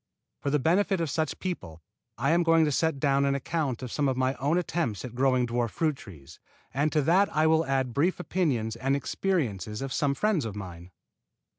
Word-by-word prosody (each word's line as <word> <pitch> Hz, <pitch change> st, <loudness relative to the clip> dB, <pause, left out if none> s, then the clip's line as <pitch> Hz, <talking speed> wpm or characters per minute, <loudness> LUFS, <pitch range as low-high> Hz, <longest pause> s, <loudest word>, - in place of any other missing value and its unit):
For 140 Hz, -, -2 dB
the 150 Hz, -, +2 dB
benefit 185 Hz, +6 st, +2 dB
of 165 Hz, -4 st, -1 dB
such 155 Hz, 0 st, -1 dB
people 170 Hz, -, -5 dB, 0.4 s
I 135 Hz, +6 st, +1 dB
am 170 Hz, +1 st, +4 dB
going 165 Hz, -1 st, +4 dB
to 150 Hz, -, 0 dB
set 160 Hz, 0 st, 0 dB
down 140 Hz, -1 st, +2 dB
an 140 Hz, 0 st, +2 dB
account 140 Hz, -3 st, -2 dB
of 125 Hz, -, -6 dB
some 145 Hz, -2 st, 0 dB
of 130 Hz, -, -1 dB
my 130 Hz, 0 st, +1 dB
own 145 Hz, +7 st, +1 dB
attempts 160 Hz, -, -2 dB
at 120 Hz, -, -8 dB
growing 130 Hz, 0 st, +2 dB
dwarf 120 Hz, 0 st, -1 dB
fruit 155 Hz, +2 st, 0 dB
trees, 80 Hz, -, -13 dB, 0.3 s
and 145 Hz, +4 st, +1 dB
to 150 Hz, -2 st, +2 dB
that 185 Hz, +7 st, +4 dB
I 155 Hz, +2 st, +2 dB
will 160 Hz, 0 st, +3 dB
add 130 Hz, -3 st, 0 dB
brief 170 Hz, +9 st, +1 dB
opinions 135 Hz, -12 st, -1 dB
and 135 Hz, +3 st, 0 dB
experiences 120 Hz, -, -2 dB
of 135 Hz, -1 st, -4 dB
some 140 Hz, -1 st, +1 dB
friends 210 Hz, -3 st, +1 dB
of 110 Hz, -3 st, -5 dB
mine. 90 Hz, -3 st, -8 dB
140 Hz, 205 wpm, -27 LUFS, 120-160 Hz, 0.4 s, am